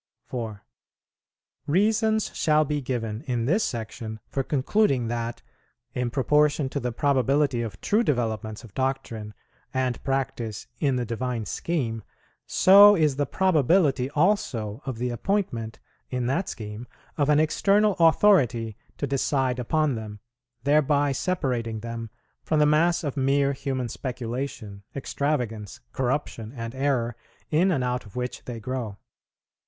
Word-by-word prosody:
4. 110 -5 -6 1.0
Reasons 215 +5 +2
shall 155 0 +3
be 150 0 -1
given 115 -4 -3
in 120 -3 0
this 185 - +2
Section 110 -1 -5
for 135 - -1
concluding 135 - +1
that, 120 0 -3 0.5
in 125 -1 -1
proportion 145 +2 +2
to - - -2
the 125 0 -2
probability 135 0 +2
of 110 -3 -5
true 215 +3 +2
developments 110 - -1
of 110 -5 -13
doctrine 130 -5 -3 0.4
and 130 -2 -1
practice 125 -5 -2
in 140 -4 +2
the 125 -1 -1
Divine 120 0 -3
Scheme, 120 -9 -2 0.5
so 205 +2 +8
is 150 -6 +2
the 145 -2 0
probability 155 -6 +2
also 145 - 0
of 130 -4 -3
the 125 +1 -2
appointment 120 - -2 0.3
in 125 -1 -2
that 155 +10 0
scheme 110 +2 -7 0.3
of 145 -1 +1
an 150 0 +5
external 200 +6 +3
authority 140 - +4 0.2
to - - -1
decide 135 -2 0
upon 155 +4 +1
them, 110 -2 -6 0.4
thereby 145 0 +3
separating 125 - -1
them 115 0 -5 0.3
from 155 - 0
the 150 - +5
mass 165 +3 +3
of 145 -3 -3
mere 140 0 +2
human 130 -2 -3
speculation, 120 -4 -5
extravagance, 125 -7 -2
corruption, 125 -4 -2
and 115 -1 -5
error, 130 -4 0 0.4
in 170 +5 +4
and 145 -8 +1
out 125 0 -1
of 105 - -15
which 125 0 -4
they 120 -2 -5
grow. 120 -3 -4
130 Hz, 135 wpm, -26 LUFS, 115-150 Hz, 1.0 s, so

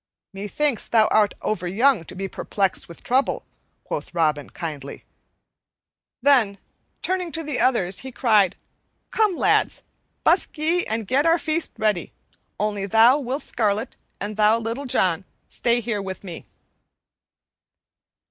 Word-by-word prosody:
"Methinks 210 +6 -1
thou 220 -2 +4
art 210 -1 +3
overyoung 210 +3 +1
to - - -8
be 195 +1 -3
perplexed 195 0 -1
with 170 - -12
trouble," 260 +3 +1 0.4
quoth - - -5
Robin 155 -3 +1
kindly; 150 -5 -7 1.2
then, 245 -8 +4 0.5
turning 365 -2 -1
to 325 - -2
the 295 -4 -3
others, 190 -8 +2
he 265 - -6
cried, 215 -7 +3 0.6
"Come, 425 -4 +2
lads, - - +2 0.4
busk - - +2
ye 330 +4 +1
and 220 0 -2
get 275 +9 +2
our 330 +1 +5
feast 320 0 -1
ready; 210 -6 0 0.5
only 205 -1 -1
thou, 230 +7 +6
Will 265 +1 -3
Scarlet, 215 -5 -1 0.2
and 210 +1 -5
thou, 215 +1 +5
Little 230 +5 -4
John, 185 -8 +1 0.2
stay 240 0 +1
here 215 -3 -2
with 190 0 -6
me." 175 -4 -8
220 Hz, 130 wpm, -23 LUFS, 195-270 Hz, 1.2 s, thou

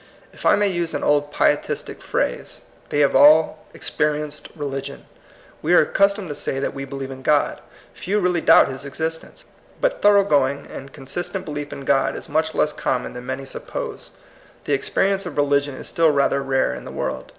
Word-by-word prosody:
If - - -3
I - - +6
may 205 0 +2
use 175 -4 -2
an 145 - -3
old 145 0 +2
pietistic - - 0
phrase, - - -3 0.3
they 145 - +1
have 145 - +3
all 155 +2 +5
"experienced 150 0 -2
religion." 140 -2 -5 0.6
We 170 +3 +3
are - - +8
accustomed 200 -2 +1
to - - -3
say 135 -1 -3
that 140 - -2
we 140 0 -5
be 135 +1 -8
lieve 135 -1 -5
in 130 0 -9
God. 145 +2 +1 0.3
Few 205 +3 -1
really 180 -3 +1
doubt - - +6
his 135 0 -6
exis 160 +4 -3
tence. - - -17 0.4
But - - 0
thorough 205 -1 +6
going 140 -4 +1
and 135 +1 -10
consistent 175 +8 -5
belief 145 -1 -5
in 135 - -8
God 135 0 +2
is - - -5
much 160 +1 0
less 150 - +1
common 125 -2 -2
than 125 0 -9
many 130 +1 -4
suppose. 135 - -7 0.5
The 145 - -1
experience 195 +7 0
of 155 - -8
religion 145 -1 +1
is - - -7
still 165 -1 +3
rather 140 -1 +2
rare 135 -1 +1
in - - -8
the - - -8
world. - - -4
145 Hz, 195 wpm, -22 LUFS, 135-165 Hz, 0.6 s, are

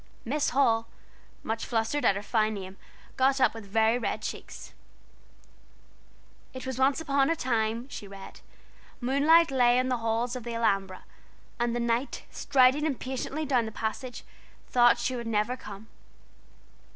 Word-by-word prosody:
"Miss 285 +5 0
Hall," 230 -4 +2 0.6
much 225 0 -3
flustered 235 +5 -1
at 195 - +4
her 200 - -4
fine 215 0 +1
name, 190 -1 -7 0.4
got 270 +1 +3
up - - +4
with 225 -3 -9
very 220 +3 +2
red 235 - -3
cheeks. - - -7 1.8
"It 260 - -7
was 260 -1 -4
once 270 +2 +3
upon 280 -3 +1
a 330 - +2
time," 230 -3 -1
she 210 -7 -8
read, 195 0 -11 0.6
"Moonlight 290 +6 +4
lay 245 -2 +4
on 255 0 +1
the 250 - +1
halls 230 +2 -1
of 250 - -6
the 235 0 -5
Alhambra, 195 -5 0 0.6
and 240 0 0
the - - -1
knight, 235 +3 -1
striding 270 +3 +3
impatiently 265 +2 -3
down 250 -5 +1
the - - -6
passage, 235 +4 -5 0.4
thought 240 -1 +4
she 255 - -2
would 235 -1 -5
never 220 +2 0
come." 210 -3 -10
240 Hz, 150 wpm, -28 LUFS, 225-265 Hz, 1.8 s, at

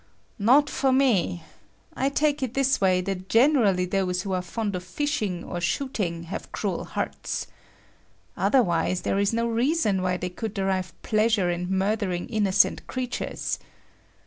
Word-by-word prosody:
Not 260 +8 +5
for 270 -2 +1
me! 235 -10 +2 0.5
I 270 - +1
take 295 +1 +1
it 255 -2 -3
this 270 -3 +2
way 185 -1 +3
that 185 0 -4
generally 225 -8 +4
those 180 -1 -1
who 195 - -3
are 185 - 0
fond 200 +3 -3
of 180 - -4
fishing 210 -4 -2
or 175 - -5
shooting 175 -4 -2
have 170 +3 -7
cruel - - -2
hearts. - - -3 0.9
Otherwise, 180 -7 +2
there 195 - 0
is 200 0 +2
no 230 0 0
reason 230 - +1
why 180 0 0
they 180 - -3
could 220 +3 -5
derive 190 -3 -2
pleasure 215 -4 +2
in 175 +1 -3
murdering 190 -2 0
innocent 205 -2 +2
creatures. 255 -1 -3
200 Hz, 145 wpm, -25 LUFS, 180-250 Hz, 0.9 s, Not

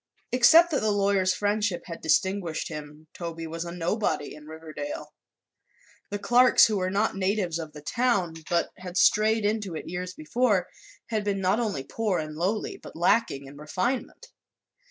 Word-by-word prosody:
Except 320 +8 +6
that 280 - +2
the 215 - 0
lawyer's 195 -2 +2
friendship 205 -2 0
had 170 -2 -8
distinguished 170 +1 0
him, 150 0 -9
Toby 165 -1 -6
was 165 +1 -5
a 170 - -6
nobody 170 -3 -1
in 150 0 -13
Riverdale. 160 - -7 1.0
The 205 - -2
Clarks, 245 +4 +6
who 215 -2 0
were 185 -1 0
not 200 +3 0
natives 190 -3 0
of 160 -2 -7
the 150 - -11
town 235 -5 +1 0.2
but 170 -1 +1
had 180 0 -6
strayed 215 +2 +4
into 210 -4 -1
it - - -6
years 180 +1 -5
before, 195 +3 +1 0.4
had 215 -2 -1
been 200 -1 -1
not 190 +4 +2
only 205 - -2
poor 210 +3 -1
and 155 -1 -4
lowly 190 +7 -2
but - - -11
lacking 165 -4 +1
in 140 +1 -12
refinement. 240 - -3
185 Hz, 165 wpm, -26 LUFS, 165-215 Hz, 1.0 s, Except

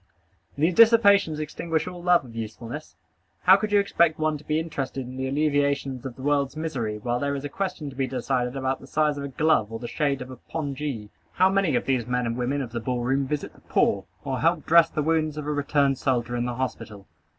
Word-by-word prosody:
These 160 +5 +2
dissipations 200 -7 +5
extinguish 160 +2 -2
all 180 -1 -7
love 175 -4 +3
of 115 -2 -13
usefulness. 115 +6 -7 0.5
How 185 - +8
could 210 +2 -2
you 205 - +5
expect 170 -5 +2
one 155 0 0
to - - -15
be 155 +1 0
interested 135 -5 -4
in 125 +1 -9
the 130 0 -2
alleviations 140 -2 0
of 125 - -9
the 130 - -10
world's 140 0 +1
misery, 125 -10 -3
while 120 +3 -2
there 140 +1 -1
is 140 0 -5
a - - -3
question 180 -4 -4
to - - -14
be 135 0 -1
decided 125 -1 -1
about 130 0 -1
the 135 - -13
size 150 0 +1
of - - -5
a - - -3
glove 140 -5 +1
or 115 - -4
the 120 +1 -6
shade 140 -1 -1
of 130 - -11
a 130 - -9
pongee? 140 -7 -5 0.2
How 185 +1 +4
many 195 -8 +2
of - - 0
these 125 -4 0
men 125 0 0
and 115 0 -2
women 130 +3 -1
of 120 - -8
the 120 - -3
ball 125 +1 -2
room 135 +2 +1
visit 150 +1 -3
the - - -21
poor, - - +1 0.2
or 135 -3 -2
help 165 +1 +1
dress 165 0 +6
the 150 - -2
wounds 155 -1 0
of 150 - -4
a 150 - -1
returned 140 -2 +1
soldier 120 -3 0
in 120 0 -1
the 125 -1 -3
hospital? 115 -5 -5
140 Hz, 235 wpm, -25 LUFS, 125-155 Hz, 0.5 s, How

